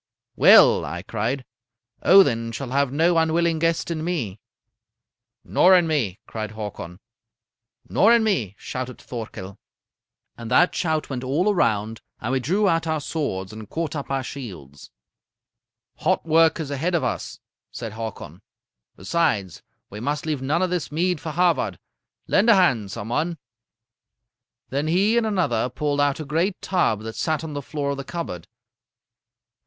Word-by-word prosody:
"'Well,' -, -, +7 dB
I 90 Hz, +1 st, -5 dB
cried, 115 Hz, +6 st, -3 dB, 0.6 s
'Odin 115 Hz, -12 st, +5 dB
shall 125 Hz, +3 st, -5 dB
have 140 Hz, -1 st, +1 dB
no 165 Hz, +4 st, +3 dB
unwilling 165 Hz, 0 st, +1 dB
guest 165 Hz, +1 st, 0 dB
in 155 Hz, -2 st, -3 dB
me.' 130 Hz, -, -3 dB, 1.0 s
"'Nor 185 Hz, +1 st, +5 dB
in 175 Hz, -2 st, +4 dB
me,' 130 Hz, -, -1 dB
cried 110 Hz, -1 st, -6 dB
Hakon. 100 Hz, -5 st, -7 dB, 0.9 s
"'Nor 220 Hz, -, +4 dB
in 230 Hz, -, +3 dB
me,' 125 Hz, -, 0 dB
shouted 125 Hz, -1 st, -6 dB
Thorkel. 105 Hz, -5 st, -8 dB, 0.8 s
"And 115 Hz, -1 st, -8 dB
that 175 Hz, +8 st, +4 dB
shout 155 Hz, -3 st, -1 dB
went 130 Hz, -1 st, -4 dB
all 165 Hz, +11 st, +1 dB
around, 110 Hz, -, 0 dB, 0.2 s
and 115 Hz, -, -3 dB
we 135 Hz, -, +1 dB
drew 190 Hz, -, +1 dB
out 165 Hz, -2 st, +1 dB
our 160 Hz, -1 st, 0 dB
swords 110 Hz, -, -3 dB
and 110 Hz, -1 st, -10 dB
caught 160 Hz, -2 st, -3 dB
up 145 Hz, -, -5 dB
our 135 Hz, -1 st, -1 dB
shields. 90 Hz, -, -9 dB, 1.1 s
"'Hot 185 Hz, +2 st, 0 dB
work 165 Hz, 0 st, +4 dB
is 150 Hz, -3 st, -4 dB
ahead 165 Hz, +6 st, -1 dB
of 165 Hz, -, +1 dB
us,' -, -, -3 dB, 0.3 s
said 115 Hz, -, -6 dB
Hakon. 110 Hz, -2 st, -7 dB, 0.5 s
'Besides, 100 Hz, -, -1 dB, 0.3 s
we 105 Hz, -, -7 dB
must 145 Hz, +6 st, -2 dB
leave 150 Hz, -4 st, -2 dB
none 150 Hz, +7 st, 0 dB
of 185 Hz, -, -1 dB
this 180 Hz, -5 st, -2 dB
mead 175 Hz, +1 st, 0 dB
for 160 Hz, -, -5 dB
Havard. 160 Hz, -, +1 dB, 0.5 s
Lend 220 Hz, +5 st, +3 dB
a 230 Hz, -, +8 dB
hand, 130 Hz, -, +2 dB
some 100 Hz, +3 st, -6 dB
one.' 160 Hz, +7 st, -1 dB, 1.3 s
"Then 140 Hz, +3 st, -1 dB
he 195 Hz, +7 st, +2 dB
and 235 Hz, -2 st, +2 dB
another 145 Hz, -, 0 dB
pulled 145 Hz, +3 st, -1 dB
out 145 Hz, 0 st, +1 dB
a 155 Hz, -, -5 dB
great 170 Hz, +6 st, -1 dB
tub 175 Hz, -, 0 dB
that 110 Hz, 0 st, -7 dB
sat 155 Hz, -1 st, -1 dB
on 160 Hz, -2 st, -6 dB
the 145 Hz, -, -4 dB
floor 140 Hz, +1 st, -3 dB
of 140 Hz, -, -3 dB
the 140 Hz, -, -5 dB
cupboard. 135 Hz, -, -6 dB
145 Hz, 160 wpm, -23 LUFS, 115-170 Hz, 1.3 s, a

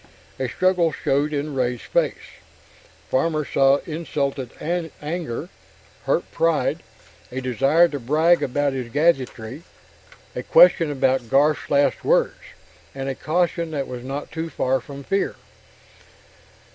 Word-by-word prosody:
A 130 Hz, -2 st, -1 dB
struggle 180 Hz, +1 st, +2 dB
showed 140 Hz, +1 st, 0 dB
in 145 Hz, 0 st, -3 dB
Ray's 125 Hz, -3 st, -1 dB
face. -, -, -2 dB, 0.7 s
Farmer 155 Hz, +2 st, +1 dB
saw 135 Hz, 0 st, +4 dB
insulted 140 Hz, -5 st, -3 dB, 0.5 s
anger, 155 Hz, -5 st, -4 dB, 0.6 s
hurt -, -, 0 dB
pride, 165 Hz, -2 st, +1 dB, 0.5 s
a 130 Hz, -, -3 dB
desire 135 Hz, +7 st, +3 dB
to 145 Hz, -, -4 dB
brag 155 Hz, +7 st, +3 dB
about 140 Hz, +2 st, 0 dB
his 125 Hz, -3 st, -4 dB
gadgetry, 135 Hz, -4 st, 0 dB, 0.7 s
a -, -, -2 dB
question 485 Hz, -, +5 dB
about 130 Hz, -4 st, 0 dB
Garf's 145 Hz, +3 st, +2 dB
last 140 Hz, 0 st, +2 dB
words, -, -, +3 dB, 0.6 s
and 135 Hz, 0 st, -3 dB
a -, -, -1 dB
caution 170 Hz, +3 st, -1 dB
that 140 Hz, -4 st, -3 dB
was 125 Hz, -1 st, -7 dB
not 135 Hz, +3 st, -5 dB
too 165 Hz, 0 st, -4 dB
far 130 Hz, -3 st, 0 dB
from 140 Hz, +1 st, -10 dB
fear. 195 Hz, +7 st, -1 dB
145 Hz, 125 wpm, -23 LUFS, 130-160 Hz, 0.7 s, question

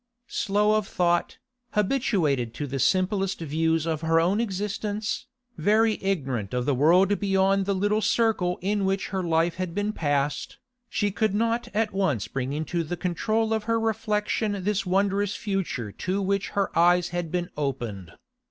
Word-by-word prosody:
Slow 210 Hz, -1 st, +1 dB
of 215 Hz, -2 st, -2 dB
thought, 175 Hz, -1 st, 0 dB, 0.4 s
habituated 185 Hz, -, +1 dB
to 145 Hz, -, -3 dB
the 135 Hz, 0 st, -4 dB
simplest 190 Hz, -, +1 dB
views 160 Hz, 0 st, 0 dB
of 160 Hz, -2 st, -2 dB
her 165 Hz, 0 st, +3 dB
own 185 Hz, +7 st, +2 dB
existence, 210 Hz, +2 st, -3 dB, 0.3 s
very 215 Hz, +5 st, +3 dB
ignorant 135 Hz, -, -1 dB
of 125 Hz, 0 st, 0 dB
the 145 Hz, -, +2 dB
world 180 Hz, +9 st, +4 dB
beyond 195 Hz, 0 st, +2 dB
the 200 Hz, -, +1 dB
little 205 Hz, +3 st, +1 dB
circle 210 Hz, -7 st, +1 dB
in 205 Hz, +1 st, 0 dB
which 195 Hz, 0 st, -1 dB
her 190 Hz, -1 st, -2 dB
life 165 Hz, 0 st, +1 dB
had 185 Hz, -2 st, -4 dB
been 205 Hz, +1 st, -1 dB
passed, 145 Hz, -3 st, -1 dB, 0.3 s
she 205 Hz, -1 st, 0 dB
could 215 Hz, 0 st, 0 dB
not 230 Hz, +2 st, 0 dB
at 215 Hz, -1 st, +1 dB
once 150 Hz, -, 0 dB
bring 130 Hz, +2 st, -3 dB
into 155 Hz, +3 st, -2 dB
the 175 Hz, +3 st, -4 dB
control 215 Hz, +6 st, 0 dB
of 220 Hz, -1 st, -1 dB
her 230 Hz, 0 st, +1 dB
reflection 215 Hz, -2 st, -1 dB
this 200 Hz, -1 st, 0 dB
wondrous 200 Hz, +2 st, +1 dB
future 190 Hz, -, -3 dB
to 185 Hz, -, -2 dB
which 200 Hz, 0 st, 0 dB
her 200 Hz, -, 0 dB
eyes 175 Hz, +1 st, +4 dB
had 175 Hz, -2 st, -3 dB
been 175 Hz, -1 st, -2 dB
opened. 115 Hz, -, -4 dB
190 Hz, 160 wpm, -26 LUFS, 165-205 Hz, 0.4 s, world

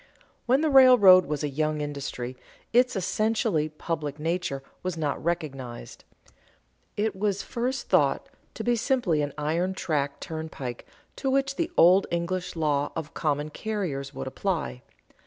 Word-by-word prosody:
_ -, -, -28 dB, 0.2 s
When 260 Hz, +4 st, +4 dB
the 315 Hz, -, +2 dB
railroad 245 Hz, -, +8 dB
was 150 Hz, 0 st, -2 dB
a -, -, +1 dB
young 155 Hz, +2 st, -1 dB
industry, 140 Hz, -4 st, -4 dB, 0.4 s
its 250 Hz, +1 st, +4 dB
essentially 190 Hz, -4 st, 0 dB
public 155 Hz, -2 st, -4 dB
nature 160 Hz, -4 st, -2 dB, 0.2 s
was 180 Hz, -2 st, -3 dB
not 150 Hz, -3 st, -2 dB
recognized. 140 Hz, -8 st, -4 dB, 0.9 s
It 210 Hz, -1 st, 0 dB
was 200 Hz, 0 st, -1 dB
at -, -, -17 dB
first 250 Hz, +3 st, -2 dB
thought -, -, +2 dB, 0.3 s
to -, -, -5 dB
be 240 Hz, 0 st, +2 dB
simply 230 Hz, -, +1 dB
an 145 Hz, 0 st, -2 dB
iron 165 Hz, +5 st, -1 dB
track 145 Hz, -6 st, -1 dB
turnpike 155 Hz, -6 st, -6 dB, 0.3 s
to 270 Hz, -, -1 dB
which 275 Hz, +1 st, +1 dB
the 335 Hz, +3 st, -1 dB
old 185 Hz, +3 st, +6 dB
English 180 Hz, +2 st, -2 dB
law 145 Hz, -3 st, 0 dB
of 160 Hz, -1 st, -5 dB
common 150 Hz, -1 st, -1 dB
carriers 165 Hz, -10 st, -3 dB
would 65 Hz, -, -6 dB
apply. 65 Hz, -1 st, -3 dB
165 Hz, 150 wpm, -26 LUFS, 145-210 Hz, 0.9 s, railroad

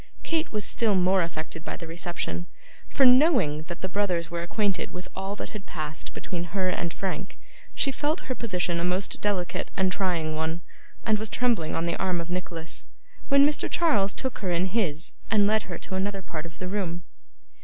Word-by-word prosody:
Kate 325 Hz, -1 st, 0 dB
was 210 Hz, -2 st, 0 dB
still 220 Hz, -4 st, +3 dB
more 185 Hz, +1 st, +4 dB
affected 160 Hz, -1 st, -4 dB
by -, -, -4 dB
the 170 Hz, -, -7 dB
reception: 170 Hz, +1 st, -3 dB, 0.4 s
for, 275 Hz, -, +4 dB
knowing 250 Hz, -, +6 dB
that 175 Hz, -1 st, -6 dB
the 190 Hz, -, -1 dB
brothers 180 Hz, -4 st, 0 dB
were 170 Hz, 0 st, -2 dB
acquainted 195 Hz, +2 st, 0 dB
with 180 Hz, +1 st, -7 dB
all 195 Hz, +1 st, -3 dB
that -, -, -5 dB
had 210 Hz, -2 st, -8 dB
passed 155 Hz, -2 st, -5 dB
between 175 Hz, -2 st, -3 dB
her 185 Hz, +2 st, 0 dB
and 170 Hz, -2 st, -1 dB
Frank, 190 Hz, +1 st, -4 dB, 0.4 s
she 275 Hz, -, +3 dB
felt 300 Hz, +5 st, 0 dB
her 260 Hz, -, -3 dB
position 180 Hz, -8 st, -1 dB
a -, -, -1 dB
most 180 Hz, +2 st, 0 dB
delicate 195 Hz, -4 st, 0 dB
and 190 Hz, -1 st, +3 dB
trying 175 Hz, -5 st, 0 dB
one, 160 Hz, +2 st, -1 dB, 0.4 s
and 215 Hz, -1 st, +3 dB
was 220 Hz, 0 st, -3 dB
trembling 230 Hz, -11 st, +1 dB
on 165 Hz, -, 0 dB
the 170 Hz, -, 0 dB
arm 185 Hz, -2 st, +1 dB
of 170 Hz, +1 st, -5 dB
Nicholas, 170 Hz, -2 st, -5 dB, 0.4 s
when 280 Hz, 0 st, +7 dB
Mr. 295 Hz, 0 st, +1 dB
Charles 210 Hz, -13 st, +3 dB
took 260 Hz, +4 st, -3 dB
her 190 Hz, -, -2 dB
in 175 Hz, +1 st, +2 dB
his, 180 Hz, -6 st, 0 dB, 0.2 s
and 210 Hz, -2 st, +5 dB
led 215 Hz, -1 st, +2 dB
her 175 Hz, -, -3 dB
to -, -, -7 dB
another 195 Hz, +1 st, -1 dB
part 165 Hz, -2 st, -5 dB
of 165 Hz, -, -14 dB
the 185 Hz, -, -4 dB
room. 180 Hz, -3 st, -2 dB
185 Hz, 195 wpm, -27 LUFS, 170-210 Hz, 0.4 s, when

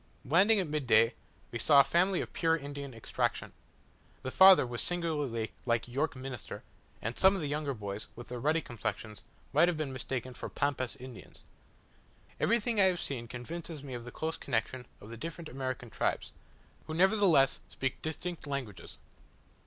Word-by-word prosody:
Landing 190 Hz, -, +5 dB
at 190 Hz, -, +1 dB
midday, 125 Hz, -7 st, +3 dB, 0.4 s
we 120 Hz, -, -4 dB
saw 140 Hz, +4 st, +6 dB
a -, -, +9 dB
family 180 Hz, +6 st, +2 dB
of -, -, -7 dB
pure 165 Hz, -1 st, +2 dB
Indian 140 Hz, -2 st, -7 dB
extraction. 115 Hz, -2 st, -2 dB, 0.7 s
The 130 Hz, -, -3 dB
father 190 Hz, -3 st, +8 dB
was 120 Hz, -1 st, -3 dB
singularly 150 Hz, -10 st, -1 dB
like 115 Hz, -1 st, 0 dB
York 145 Hz, +5 st, -1 dB
Minster; 130 Hz, -3 st, -7 dB, 0.4 s
and 115 Hz, +3 st, -2 dB
some 190 Hz, +1 st, +6 dB
of 190 Hz, -, -3 dB
the 150 Hz, -, -2 dB
younger 145 Hz, -1 st, -2 dB
boys, 100 Hz, -1 st, -6 dB
with 120 Hz, -, -10 dB
their 125 Hz, 0 st, -5 dB
ruddy 155 Hz, +6 st, +2 dB
complexions, 110 Hz, -3 st, -5 dB, 0.3 s
might 175 Hz, -, +6 dB
have 175 Hz, -3 st, 0 dB
been 150 Hz, -4 st, -3 dB
mistaken 130 Hz, -1 st, -4 dB
for -, -, -7 dB
Pampas 140 Hz, -3 st, -1 dB
Indians. 130 Hz, -2 st, -12 dB, 1.0 s
Everything 230 Hz, 0 st, +2 dB
I -, -, +7 dB
have 180 Hz, -2 st, +2 dB
seen, 120 Hz, -7 st, -3 dB
convinces 155 Hz, +5 st, -6 dB
me 135 Hz, -2 st, -7 dB
of 120 Hz, -1 st, -5 dB
the 120 Hz, -, -9 dB
close 160 Hz, +4 st, -3 dB
connexion 125 Hz, 0 st, -2 dB
of 105 Hz, -, -12 dB
the 115 Hz, -, -7 dB
different 165 Hz, +4 st, -6 dB
American 130 Hz, -2 st, -4 dB
tribes, -, -, -1 dB, 0.5 s
who 155 Hz, -, -4 dB
nevertheless 185 Hz, -7 st, +4 dB
speak 135 Hz, -1 st, -3 dB
distinct 165 Hz, 0 st, -5 dB
languages. 125 Hz, -11 st, -5 dB
140 Hz, 170 wpm, -31 LUFS, 120-165 Hz, 1.0 s, a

